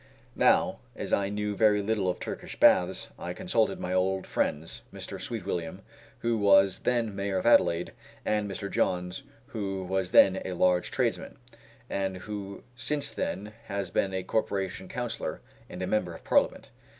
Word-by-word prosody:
Now, -, -, +3 dB, 0.2 s
as -, -, -4 dB
I 100 Hz, -1 st, +2 dB
knew 105 Hz, 0 st, -2 dB
very 105 Hz, -1 st, +4 dB
little 100 Hz, -2 st, 0 dB
of 90 Hz, -, -2 dB
Turkish -, -, -6 dB
baths, -, -, +4 dB
I -, -, -4 dB
consulted -, -, 0 dB
my 90 Hz, -, -3 dB
old 95 Hz, +1 st, +1 dB
friends, 80 Hz, +2 st, -2 dB
Mr. -, -, -7 dB
Sweetwilliam, 90 Hz, -7 st, -4 dB, 0.4 s
who 115 Hz, -1 st, +1 dB
was 100 Hz, -1 st, +5 dB
then 115 Hz, -4 st, 0 dB
Mayor 100 Hz, -1 st, -1 dB
of 95 Hz, -, -2 dB
Adelaide, 90 Hz, -7 st, +4 dB, 0.3 s
and 105 Hz, -1 st, 0 dB
Mr. 100 Hz, +1 st, -4 dB
Johns, 90 Hz, +3 st, -1 dB, 0.3 s
who 95 Hz, -4 st, -3 dB
was 95 Hz, 0 st, -1 dB
then 95 Hz, 0 st, +6 dB
a 95 Hz, -, -4 dB
large 90 Hz, 0 st, +2 dB
tradesman, -, -, -1 dB, 0.5 s
and 95 Hz, -1 st, -2 dB
who 100 Hz, 0 st, -7 dB
since 145 Hz, +3 st, -2 dB
then 105 Hz, +3 st, -4 dB
has 100 Hz, -3 st, -3 dB
been 95 Hz, -, +1 dB
a 95 Hz, -1 st, -2 dB
corporation 95 Hz, -2 st, -2 dB
councillor, 120 Hz, +1 st, -4 dB, 0.3 s
and 90 Hz, -, -6 dB
a -, -, 0 dB
member 90 Hz, -4 st, 0 dB
of -, -, -13 dB
Parliament. -, -, +2 dB
95 Hz, 160 wpm, -28 LUFS, 95-105 Hz, 0.5 s, then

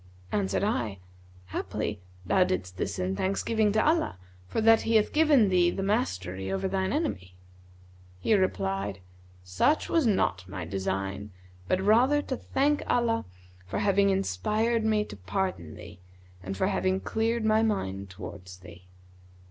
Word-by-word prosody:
Answered 100 Hz, -, 0 dB
I, 120 Hz, -, -1 dB, 0.5 s
'Haply 105 Hz, +1 st, -3 dB, 0.2 s
thou 185 Hz, -, +4 dB
didst 95 Hz, -, -3 dB
this 100 Hz, 0 st, -3 dB
in 95 Hz, +1 st, -1 dB
thanksgiving 210 Hz, -, +1 dB
to 215 Hz, -, +2 dB
Allah, 320 Hz, -, +1 dB, 0.3 s
for -, -, -2 dB
that 225 Hz, 0 st, +5 dB
He 225 Hz, -, 0 dB
hath 215 Hz, -1 st, +3 dB
given 295 Hz, -9 st, +5 dB
thee 180 Hz, -2 st, +4 dB
the 195 Hz, -, -3 dB
mastery 95 Hz, -, -1 dB
over 195 Hz, 0 st, -1 dB
thine 190 Hz, 0 st, -1 dB
enemy.' 95 Hz, -, -2 dB, 0.8 s
He 220 Hz, -, +1 dB
replied, 100 Hz, -, 0 dB, 0.5 s
'Such 90 Hz, -, +1 dB
was 325 Hz, -7 st, +3 dB
not 95 Hz, -, 0 dB
my 95 Hz, -3 st, -5 dB
design, 95 Hz, +2 st, -3 dB, 0.4 s
but 185 Hz, -, +1 dB
rather 245 Hz, +9 st, +4 dB
to 260 Hz, -, -3 dB
thank 290 Hz, +4 st, 0 dB
Allah 235 Hz, -, +1 dB, 0.4 s
for 95 Hz, -, -3 dB
having 200 Hz, 0 st, +3 dB
inspired 210 Hz, -, 0 dB
me 215 Hz, -1 st, +2 dB
to -, -, -9 dB
pardon 100 Hz, -, -3 dB
thee 100 Hz, -1 st, -12 dB, 0.4 s
and 95 Hz, +1 st, -5 dB
for -, -, +1 dB
having 190 Hz, 0 st, +1 dB
cleared 225 Hz, +2 st, -1 dB
my 220 Hz, 0 st, +4 dB
mind 100 Hz, -, -1 dB
towards 95 Hz, -1 st, -9 dB
thee. 90 Hz, -1 st, -14 dB
185 Hz, 150 wpm, -28 LUFS, -, 0.8 s, that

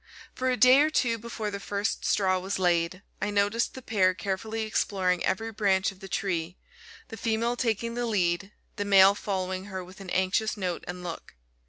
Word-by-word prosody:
For 260 Hz, 0 st, -1 dB
a 250 Hz, -, +1 dB
day 255 Hz, +2 st, +7 dB
or 300 Hz, +1 st, +4 dB
two 235 Hz, -7 st, +1 dB
before 220 Hz, -2 st, -5 dB
the 200 Hz, -, -4 dB
first 205 Hz, +2 st, -2 dB
straw 185 Hz, -2 st, +2 dB
was 190 Hz, +2 st, -3 dB
laid, 175 Hz, +1 st, +1 dB, 0.2 s
I 210 Hz, -, 0 dB
noticed 205 Hz, +3 st, +1 dB
the 260 Hz, -, -9 dB
pair 185 Hz, -5 st, +2 dB
carefully 215 Hz, +4 st, -3 dB
exploring 190 Hz, -4 st, 0 dB
every 225 Hz, +3 st, -1 dB
branch 200 Hz, -3 st, +1 dB
of 195 Hz, -, -17 dB
the 195 Hz, -, -9 dB
tree, 175 Hz, -2 st, -2 dB, 0.5 s
the 225 Hz, -, -8 dB
female 230 Hz, +2 st, 0 dB
taking 230 Hz, -1 st, -1 dB
the 240 Hz, 0 st, -2 dB
lead, 190 Hz, -2 st, 0 dB, 0.3 s
the 205 Hz, -, -1 dB
male 195 Hz, -1 st, +7 dB
following 190 Hz, -2 st, -3 dB
her 190 Hz, -2 st, -6 dB
with 185 Hz, +2 st, -13 dB
an 190 Hz, -, -8 dB
anxious 190 Hz, +4 st, 0 dB
note 180 Hz, -4 st, -3 dB
and 180 Hz, 0 st, -6 dB
look. 170 Hz, -2 st, -7 dB
200 Hz, 190 wpm, -27 LUFS, 185-225 Hz, 0.5 s, day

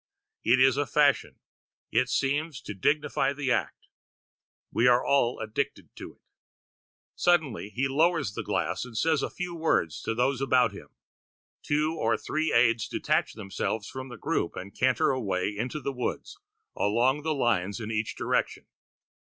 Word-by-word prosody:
It 120 Hz, +3 st, +4 dB
is 130 Hz, +1 st, +5 dB
a 145 Hz, -1 st, 0 dB
fashion; 145 Hz, -2 st, +2 dB, 0.6 s
it 130 Hz, +3 st, +2 dB
seems 145 Hz, +1 st, 0 dB
to 105 Hz, -, -6 dB
dignify 145 Hz, +7 st, +1 dB
the 140 Hz, -2 st, -2 dB
act; 105 Hz, -, -1 dB, 0.9 s
we 120 Hz, -, +3 dB
are 125 Hz, 0 st, +4 dB
all 135 Hz, -3 st, +2 dB
addicted 110 Hz, +5 st, -4 dB
to -, -, -9 dB
it. -, -, -41 dB, 0.9 s
Suddenly 155 Hz, -, +1 dB
he 125 Hz, +6 st, -1 dB
lowers 155 Hz, -3 st, +1 dB
the -, -, -3 dB
glass -, -, -1 dB
and 125 Hz, -3 st, -8 dB
says 155 Hz, +4 st, +2 dB
a -, -, -2 dB
few 180 Hz, -1 st, -5 dB
words 160 Hz, -, 0 dB
to 115 Hz, -, -2 dB
those 125 Hz, +2 st, +1 dB
about 130 Hz, -2 st, +3 dB
him. -, -, -11 dB, 0.7 s
Two 150 Hz, +2 st, 0 dB
or 115 Hz, +1 st, +2 dB
three 155 Hz, +1 st, -1 dB
aides 115 Hz, -2 st, +3 dB
detach -, -, 0 dB
themselves 105 Hz, 0 st, -3 dB
from 130 Hz, 0 st, -7 dB
the 120 Hz, -, -9 dB
group 85 Hz, -, -1 dB
and 95 Hz, +2 st, -8 dB
canter 130 Hz, -1 st, +2 dB
away 100 Hz, -6 st, -1 dB
into 125 Hz, +8 st, -3 dB
the 140 Hz, -1 st, -3 dB
woods, 125 Hz, -1 st, -4 dB, 0.4 s
along 120 Hz, +7 st, +2 dB
the 155 Hz, 0 st, -1 dB
lines 105 Hz, -6 st, 0 dB
in 110 Hz, -1 st, -5 dB
each 110 Hz, 0 st, -2 dB
direction. -, -, -1 dB
130 Hz, 160 wpm, -27 LUFS, 110-145 Hz, 0.9 s, is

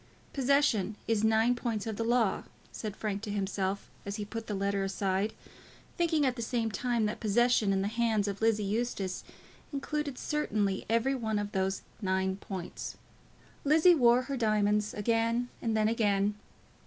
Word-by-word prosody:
"Possession 260 Hz, -7 st, +2 dB
is 220 Hz, -2 st, +1 dB
nine 220 Hz, +2 st, +4 dB
points 235 Hz, -4 st, -2 dB
of 220 Hz, -2 st, -3 dB
the 230 Hz, -, -2 dB
law," 230 Hz, -3 st, +1 dB, 0.3 s
said 215 Hz, -2 st, -5 dB
Frank 205 Hz, -2 st, -3 dB
to 215 Hz, -, -6 dB
himself, 195 Hz, -1 st, -2 dB, 0.2 s
as 200 Hz, 0 st, -4 dB
he 210 Hz, -1 st, -4 dB
put 225 Hz, +2 st, -6 dB
the 210 Hz, -, -2 dB
letter 200 Hz, 0 st, 0 dB
aside, 195 Hz, +2 st, -1 dB, 0.6 s
thinking 325 Hz, -4 st, +2 dB
at 255 Hz, -2 st, +1 dB
the 235 Hz, -, -5 dB
same 230 Hz, -1 st, -1 dB
time 240 Hz, 0 st, 0 dB
that 210 Hz, -, -2 dB
possession 225 Hz, -1 st, +3 dB
in 195 Hz, 0 st, +1 dB
the -, -, 0 dB
hands 220 Hz, -2 st, +1 dB
of 200 Hz, 0 st, -4 dB
Lizzie 220 Hz, -1 st, +3 dB
Eustace 200 Hz, -3 st, -2 dB, 0.5 s
included 285 Hz, -1 st, -3 dB
certainly 210 Hz, -10 st, -1 dB
every 230 Hz, +4 st, +2 dB
one 220 Hz, -5 st, -1 dB
of 205 Hz, 0 st, -2 dB
those 190 Hz, -1 st, -1 dB, 0.2 s
nine 190 Hz, -1 st, 0 dB
points. 190 Hz, -3 st, -6 dB, 0.7 s
Lizzie 315 Hz, +5 st, +6 dB
wore 245 Hz, -4 st, +5 dB
her 275 Hz, +1 st, -3 dB
diamonds 210 Hz, -2 st, +1 dB
again 230 Hz, +3 st, +1 dB
and 225 Hz, -1 st, 0 dB
then 215 Hz, 0 st, +3 dB
again. 205 Hz, -3 st, +2 dB
220 Hz, 165 wpm, -30 LUFS, 200-240 Hz, 0.7 s, Lizzie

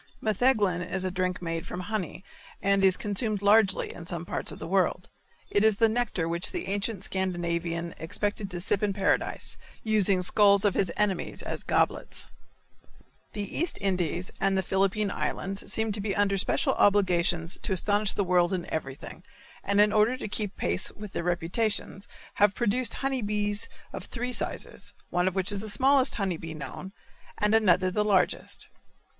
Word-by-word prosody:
Metheglin 215 Hz, -5 st, +2 dB
is 185 Hz, +1 st, -3 dB
a 185 Hz, -, -1 dB
drink 185 Hz, 0 st, -2 dB
made 165 Hz, -1 st, -3 dB
from 180 Hz, -, -5 dB
honey, 190 Hz, -3 st, -4 dB, 0.4 s
and 200 Hz, 0 st, +2 dB
is 190 Hz, -1 st, +5 dB
consumed 210 Hz, 0 st, -1 dB
largely 205 Hz, -1 st, +4 dB
in 170 Hz, -1 st, -10 dB
some 170 Hz, -1 st, -4 dB
parts -, -, -1 dB
of -, -, -8 dB
the -, -, -7 dB
world. 180 Hz, 0 st, 0 dB, 0.4 s
It 205 Hz, -, +3 dB
is 220 Hz, -1 st, +5 dB
the 225 Hz, +2 st, +4 dB
nectar 220 Hz, -7 st, -1 dB
which 170 Hz, +1 st, +1 dB
the -, -, -4 dB
ancient 200 Hz, 0 st, -2 dB
Scandinavian 170 Hz, -3 st, -2 dB
expected 205 Hz, +4 st, -2 dB
to 180 Hz, -2 st, -5 dB
sip 190 Hz, +2 st, +1 dB
in 205 Hz, -2 st, +1 dB
paradise, 195 Hz, 0 st, 0 dB, 0.3 s
using 200 Hz, -4 st, +2 dB
skulls 200 Hz, +1 st, +4 dB
of 200 Hz, -, +3 dB
his 185 Hz, -4 st, 0 dB
enemies 205 Hz, -4 st, -1 dB
as -, -, -5 dB
goblets. -, -, 0 dB, 1.0 s
The 205 Hz, -, -3 dB
East 340 Hz, +2 st, 0 dB
Indies 180 Hz, -2 st, -1 dB
and 195 Hz, 0 st, +2 dB
the 190 Hz, -, +1 dB
Philippine 195 Hz, +2 st, +1 dB
Islands 195 Hz, 0 st, -3 dB
seem 220 Hz, -1 st, +1 dB
to 205 Hz, 0 st, -2 dB
be 200 Hz, -1 st, -2 dB
under 205 Hz, -1 st, +2 dB
special 195 Hz, -, +1 dB
obligations 175 Hz, -4 st, +2 dB
to -, -, -1 dB
astonish 205 Hz, +2 st, +2 dB
the 200 Hz, -, 0 dB
world 180 Hz, -1 st, +2 dB
in 175 Hz, -2 st, -2 dB
everything, 135 Hz, -4 st, -5 dB, 0.4 s
and 200 Hz, +1 st, +1 dB
in 210 Hz, 0 st, +5 dB
order 215 Hz, +4 st, +3 dB
to -, -, -5 dB
keep 205 Hz, -1 st, -3 dB
pace 85 Hz, +1 st, +1 dB
with 210 Hz, -1 st, -9 dB
their -, -, -3 dB
reputations 180 Hz, +4 st, -2 dB, 0.3 s
have 205 Hz, -1 st, +4 dB
produced 240 Hz, +1 st, 0 dB
honey 270 Hz, -2 st, -1 dB
bees 205 Hz, 0 st, -1 dB, 0.2 s
of -, -, -6 dB
three 245 Hz, +1 st, -4 dB
sizes, -, -, -3 dB, 0.2 s
one 180 Hz, +1 st, +1 dB
of 190 Hz, -, -1 dB
which 190 Hz, +1 st, +1 dB
is 200 Hz, -, 0 dB
the 215 Hz, +2 st, -4 dB
smallest 265 Hz, +5 st, +4 dB
honey 190 Hz, -5 st, -1 dB
bee 160 Hz, 0 st, -7 dB
known, 155 Hz, +6 st, -7 dB, 0.5 s
and 210 Hz, +1 st, +1 dB
another 185 Hz, -4 st, +4 dB
the 210 Hz, +3 st, +1 dB
largest. 200 Hz, -3 st, +1 dB
195 Hz, 175 wpm, -28 LUFS, 180-210 Hz, 1.0 s, is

